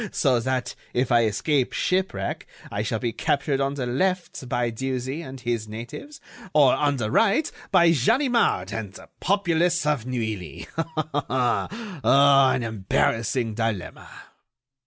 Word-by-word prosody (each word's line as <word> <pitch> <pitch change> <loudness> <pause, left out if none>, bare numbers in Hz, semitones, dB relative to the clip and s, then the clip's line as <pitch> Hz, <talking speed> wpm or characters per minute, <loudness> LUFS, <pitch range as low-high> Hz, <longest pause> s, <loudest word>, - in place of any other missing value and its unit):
So 130 -5 +2
that, 130 +1 -2 0.2
if 125 +1 +1
I 120 -1 +5
escape 130 +6 0
shipwreck, 185 +1 -1 0.2
I 100 - -2
shall 110 +1 -1
be 115 0 -2
captured 140 -1 0
on 135 +1 0
the 130 -3 -3
left 170 0 -1
by 120 -1 0
Dieuzy 130 +4 -3
and 135 -4 -9
his 120 -3 -2
natives, 120 - -8 0.4
or, 140 -4 +6
on 145 0 +1
the 110 -3 -2
right, 225 +8 +3 0.2
by 170 -3 +5
Ganimard 225 - +2
and 105 -3 -5
the - - -13
populace 175 -3 +1
of 145 -6 0
Neuilly. 110 -9 -4 0.6
An 135 - +3
embarrassing 115 +2 0
dilemma!" 110 -4 -3
130 Hz, 130 wpm, -24 LUFS, 115-160 Hz, 0.6 s, or